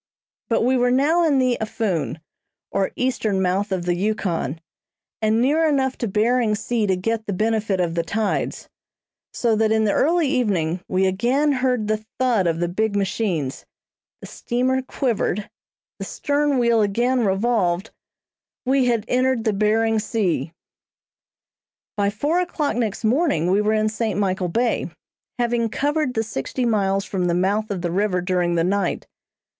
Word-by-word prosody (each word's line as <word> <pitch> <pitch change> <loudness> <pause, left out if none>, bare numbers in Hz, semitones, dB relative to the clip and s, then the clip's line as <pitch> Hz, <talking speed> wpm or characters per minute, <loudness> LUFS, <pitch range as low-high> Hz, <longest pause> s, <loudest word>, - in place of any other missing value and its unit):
But 230 - +2
we 255 +2 +3
were 245 0 +2
now 295 +7 +3
in 300 -4 +3
the 255 -2 +2
Aphoon, 185 - -2 0.5
or 195 - 0
eastern 225 -6 0
mouth 190 +2 0
of 185 -2 -2
the 175 - +1
Yukon, 175 -5 -2 0.6
and 220 +1 +2
near 290 +7 +2
enough 265 -3 +1
to 235 - -1
Behring 220 +2 +2
Sea 220 0 -1
to 190 - +2
get 220 +4 -2
the 200 - -1
benefit 215 -1 0
of 175 -2 0
the 170 - 0
tides; 210 +6 -2 0.6
so 230 -2 +1
that 220 0 +2
in 220 0 +3
the 210 - +2
early 330 - +2
evening 195 - 0
we 185 +1 +1
again 245 +10 +1
heard 255 -4 0
the 215 0 -1
thud 240 -8 +2
of 165 -1 0
the 175 - 0
big 205 +4 -1
machines, 190 - -1 0.6
the - - -8
steamer 255 +2 -1
quivered, 235 -6 -2 0.5
the - - -4
stern 290 -1 0
wheel 235 -2 +3
again 240 +5 +1
revolved, 195 -2 0 0.7
we 265 0 +3
had 230 -3 +1
entered 255 -2 +1
the 220 - +1
Behring 220 +2 +2
Sea! 210 -7 -1 1.4
By 200 -1 +1
four 290 - 0
o'clock 315 -8 -1
next 225 -4 -2
morning 220 - +2
we 200 +2 +3
were 210 +1 +1
in 215 0 +2
St. 215 -2 -2
Michael 185 -2 0
Bay, 235 +6 0 0.5
having 240 -1 0
covered 290 +1 -1
the 225 - +1
sixty 225 - -3
miles 195 -3 +1
from 185 -2 -2
the 170 -1 +1
mouth 200 +4 0
of 190 -4 -4
the 175 - -1
river 190 0 +1
during 180 -1 0
the 165 - +2
night. 200 +3 -1
220 Hz, 160 wpm, -22 LUFS, 190-245 Hz, 1.4 s, we